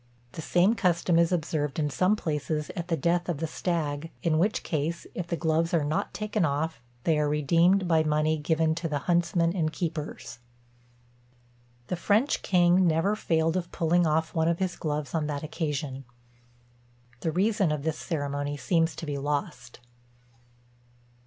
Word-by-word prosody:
The 160 - -7
same 180 +7 +3
custom 175 -5 +2
is 170 0 +3
observed 155 -4 -1
in 150 -2 0
some 185 +10 +2
places 150 -4 -2
at 170 0 -4
the 165 -2 0
death 175 +4 0
of 170 - -1
the 165 - -2
stag; 160 -2 -2
in 160 -2 +2
which 205 +5 +1
case, 160 +2 -2
if 180 - -4
the 170 - -2
gloves 165 +1 +1
are 160 - +2
not 150 +2 -1
taken 210 -1 -2
off, 155 0 -1 0.2
they 160 -2 +2
are 150 -1 +1
redeemed 170 +6 +3
by 165 -2 +4
money 155 0 +1
given 160 +1 +1
to 170 +1 -3
the 150 - 0
huntsmen 170 0 +2
and 160 -4 0
keepers. 155 -7 -5 1.5
The 180 - -2
French 210 - +1
king 180 0 +4
never 165 +6 +2
failed 165 -4 +1
of 175 -2 -3
pulling 170 +1 +2
off 160 +1 0
one 160 -1 +1
of 170 0 +1
his 185 -1 -2
gloves 150 -2 -3
on 155 -3 0
that 145 -1 -3
occasion. 150 -4 -3 1.1
The 160 - -1
reason 195 0 +2
of 150 -2 -2
this 160 0 -2
ceremony 145 -2 -3
seems 165 +1 +1
to - - -6
be 145 -2 -3
lost. 140 -4 -4
160 Hz, 165 wpm, -27 LUFS, 150-175 Hz, 1.5 s, by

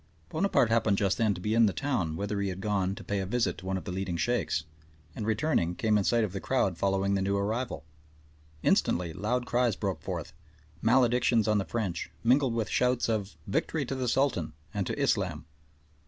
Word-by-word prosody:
Bonaparte 160 - +2
happened 110 -3 +3
just 100 +2 +1
then 110 -3 +2
to - - -7
be 105 +4 -1
in 115 -1 +5
the - - +1
town, 115 - -1
whither 100 +2 -2
he 100 - 0
had 95 0 -5
gone 95 -2 0
to - - -9
pay 100 -1 -2
a 95 - -2
visit 120 +3 0
to 95 - -9
one 95 0 0
of - - -6
the - - -5
leading 95 -2 -2
Sheikhs, 120 -6 0 0.5
and 105 - -4
returning 110 - +1
came 110 +1 +1
in 105 - +3
sight 115 +3 +2
of 105 - -2
the 95 - -3
crowd 110 -9 +1
following 95 +2 +1
the 100 - +1
new 100 +1 +1
arrival. 110 +1 -2 0.8
Instantly 85 -2 +2
loud 120 +8 -1
cries 120 -3 +1
broke 95 -6 -3
forth, - - -5 0.5
maledictions 120 -1 +3
on 105 -1 +3
the 95 - -2
French, 95 -2 -3
mingled 125 0 +3
with 115 -2 0
shouts 125 -1 +1
of 105 -3 -2
"Victory 140 +9 -1
to 130 - -4
the 130 -1 -2
Sultan" 120 - +1 0.2
and - - -1
to - - -3
Islam. - - 0
105 Hz, 205 wpm, -29 LUFS, 95-120 Hz, 0.8 s, in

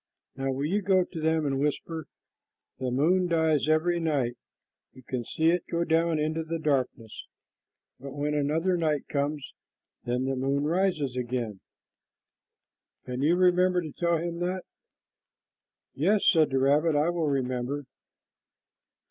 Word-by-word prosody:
Now 135 0 -2
will 135 +2 -2
you 195 +7 0
go 190 -1 +3
to 170 -2 -8
them 160 0 +1
and 135 -1 0
whisper, 150 +2 -2 0.7
'The 130 - -1
moon 170 +9 +2
dies 160 -3 +2
every 170 +2 +2
night. 140 -7 0 0.6
You 130 - -15
can 125 -1 -3
see 160 +7 +1
it 175 0 -1
go 170 0 0
down 165 0 +2
into 155 +2 -1
the 165 +1 -3
darkness, 130 -7 -2 0.7
but 135 +1 -8
when 145 +1 -1
another 160 +5 +1
night 155 -4 0
comes, 145 0 -2 0.5
then 125 +2 -1
the 135 0 -1
moon 135 +2 0
rises 155 -5 0
again,' 120 -5 -3 1.5
can 125 0 -4
you 160 +5 +3
remember 180 0 +3
to 160 -4 -5
tell 170 +1 0
them 170 +1 -4
that?" 180 +1 -2 1.3
"Yes," 195 +8 +2
said 160 -4 +5
the 135 - 0
rabbit, 145 +4 +3
"I 150 +3 +2
will 170 -3 -1
remember." 130 0 -1
155 Hz, 145 wpm, -27 LUFS, 135-170 Hz, 1.5 s, said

